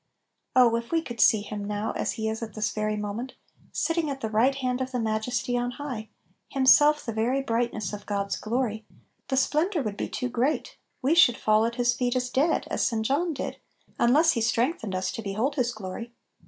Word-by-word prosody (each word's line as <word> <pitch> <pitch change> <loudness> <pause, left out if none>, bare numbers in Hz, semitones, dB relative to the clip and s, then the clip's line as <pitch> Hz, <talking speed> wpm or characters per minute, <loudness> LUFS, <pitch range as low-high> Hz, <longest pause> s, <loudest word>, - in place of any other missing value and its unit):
" - - -52
Oh 245 -3 +6
if 235 0 -6
we 330 -1 +1
could 240 -5 -4
see 215 - +5
Him 205 0 -6
now, 210 +1 -2
as - - -2
He 220 -1 -3
is 220 +1 -3
at 220 -3 -6
this 210 -1 -1
very 215 0 -1
moment, 210 +5 -5 0.4
sitting 330 -2 0
at 275 -1 -4
the 220 -4 -4
right 225 +5 +4
h<md - - -6
of 265 - -4
Little 250 0 +1
Pillows. - - -14
6l - - -19
the 250 - 0
Majesty 230 +2 -1
on 245 0 -2
high, 250 -7 -5 0.4
Himself 295 +2 +5
the 230 - -3
very 245 +5 0
brightness 230 -4 -1
of 205 - -8
God's 200 -1 -1
glory, 225 -1 -2 0.4
the 265 - -1
splendor 310 +5 +1
would 210 -3 -4
be - - -3
too 250 - -2
great, 250 +6 -1 0.3
we 275 +5 +3
should 290 -9 +6
fall 215 +1 +3
at 235 - -4
His 240 -1 +2
feet 245 +1 -1
as 250 0 -1
dead, 295 +6 +2
as - - 0
St. 225 -4 0
John 305 +8 +1
did, 280 - -4 0.4
un 235 - +4
less 315 +5 +5
He 230 - -1
strengthened 230 - 0
us 185 0 -1
to - - -5
behold 220 +7 -1
His 250 -4 0
glory. 215 +2 -7
240 Hz, 225 wpm, -26 LUFS, 215-265 Hz, 0.4 s, Oh